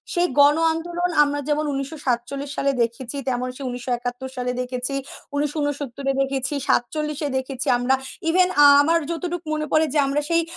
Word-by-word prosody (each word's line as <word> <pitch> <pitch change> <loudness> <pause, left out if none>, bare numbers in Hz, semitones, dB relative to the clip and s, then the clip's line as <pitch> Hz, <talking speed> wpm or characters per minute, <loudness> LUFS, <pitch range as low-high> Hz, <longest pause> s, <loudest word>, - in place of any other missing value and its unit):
সেই 350 0 +2
গণ 290 +1 +6 0.2
আন্দোলন 345 +2 -2
আমরা 290 0 0
যেমন 300 +1 +1
১৯৪৭ 275 -1 -3
সালে 275 0 +1
দেখেছি 235 +3 -3
তেমন 250 0 -1
সেই 275 - -7
১৯৭১ 245 +1 -4
সালে 250 0 -2
দেখেছি, 250 +2 -3 0.4
১৯৬৯ 290 -2 -2
এ - - +3
দেখেছি, 270 +1 -1
৪৭ 300 +4 0
এ - - -1
দেখেছি 260 0 -4
আমরা 245 +2 +2 0.3
even 365 +2 +4
আ - - +9 0.2
আমার 330 +3 +3
যতটুক 345 0 -3
মনে 305 0 -1
পড়ে 310 +1 +4
যে, - - +2
আমরা 280 +2 0
সেই 335 0 +3
280 Hz, 165 wpm, -23 LUFS, 255-310 Hz, 0.4 s, আ